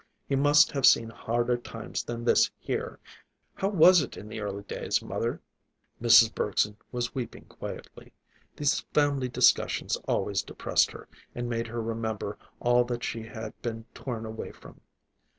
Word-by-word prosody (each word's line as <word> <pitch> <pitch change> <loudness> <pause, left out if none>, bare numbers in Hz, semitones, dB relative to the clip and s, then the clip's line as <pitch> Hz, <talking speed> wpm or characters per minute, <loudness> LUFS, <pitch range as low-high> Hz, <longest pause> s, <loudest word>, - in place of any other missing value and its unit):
He 140 - 0
must 145 +2 +5
have 140 -3 +4
seen 115 0 +4
harder 120 +1 0
times 115 -2 -6
than 120 0 -6
this, - - +4
here. - - -4 0.6
How 195 - -1
was 180 -2 +7
it 135 - -6
in 105 - -9
the 110 0 -6
early 100 -1 -4
days, - - -1
mother?" - - -3 0.6
Mrs. 115 -1 +7
Bergson 105 0 0 0.2
was 120 -1 -2
weeping 125 -3 -6
quietly. - - -9 0.4
These 145 0 +1 0.2
family 140 -3 +2
discussions 125 - +2
always - - 0
depressed - - +1
her, - - -11 0.3
and 120 0 -3
made 115 -1 -2
her 115 0 -4
remember 110 -2 -3 0.2
all 120 0 +4
that 120 0 -4
she 115 - -3
had 110 -1 -7
been 115 -1 -4
torn 115 -4 -5
away 110 0 -6
from. - - -16
120 Hz, 155 wpm, -28 LUFS, 110-125 Hz, 0.6 s, was